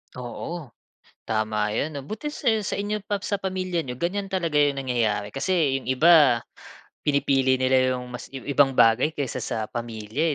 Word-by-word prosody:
Oo, 125 +4 -6 0.6
tama 110 -1 -1
yun 145 +3 -2
'no. 135 - -9
Buti 220 - -5
sa 295 - -9 0.2
sa - - -3
inyo 205 +1 -2
pa 205 0 -2
sa 200 0 -3
pamilya 185 -2 -2
n'yo 125 -3 -7
ganyan 195 +3 -2
talaga 175 -5 -1
yung 145 -1 +3
nangyayari, 110 -6 -1
kasi 155 -1 +1
'yong - - -10
iba 145 -2 +6 0.7
pinipili 135 -2 +2
nila 130 0 +3
'yong 125 - -7
maski 135 +2 -7 0.2
ibang 140 -1 +5
bagay 115 +7 +5
kaysa 140 -3 -3
sa 115 - -3
pamilya, 120 +6 -2
140 Hz, 160 wpm, -25 LUFS, 125-175 Hz, 0.7 s, iba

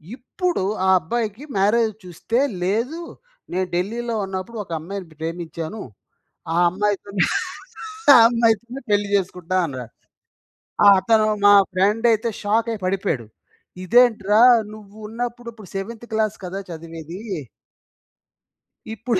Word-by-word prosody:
ఇప్పుడు 305 - -2 0.2
ఆ - - +4
అబ్బాయికి 220 - -3
మ్యారేజ్ 220 +3 +3
చూస్తే 180 +7 -2 0.2
లేదూ, 230 - -1 0.5
"నేను 185 0 0
ఢిల్లీలో 230 +6 -2
ఉన్నప్పుడు 190 +4 -6
ఒక 170 - -15
అమ్మాయిని 190 +2 -7
ప్రేమించాను. 165 +4 -5 0.7
ఆ - - -1
అమ్మాయితోనే 200 0 -1 0.9
ఆ - - +10
అమ్మాయితోనే 235 +2 0
పెళ్లి 205 0 +2
చేసుకుంటా" 185 -1 -1
అన్నాడు. 125 -5 -7 0.9
ఆహ్, 200 - +9
అతను 215 +2 +3 0.2
మా 205 - +8 0.2
ఫ్రెండయితే 220 +4 +2
షాక్ 220 +3 +1
అయి 205 - -7
పడిపోయాడు. 185 - -1 0.6
ఇదేంట్రా 220 -1 +4 0.3
నువ్వు 210 -1 -14
ఉన్నప్పుడు 240 +1 -5
ఇప్పుడు 215 -5 -14
సెవెంత్ 225 +4 -5
క్లాస్ 215 -1 0
కదా! 190 +2 -5
చదివేదీ. 165 +1 -8 1.7
ఇప్పుడు 225 -2 -1
205 Hz, 110 wpm, -22 LUFS, 185-230 Hz, 1.7 s, ఆ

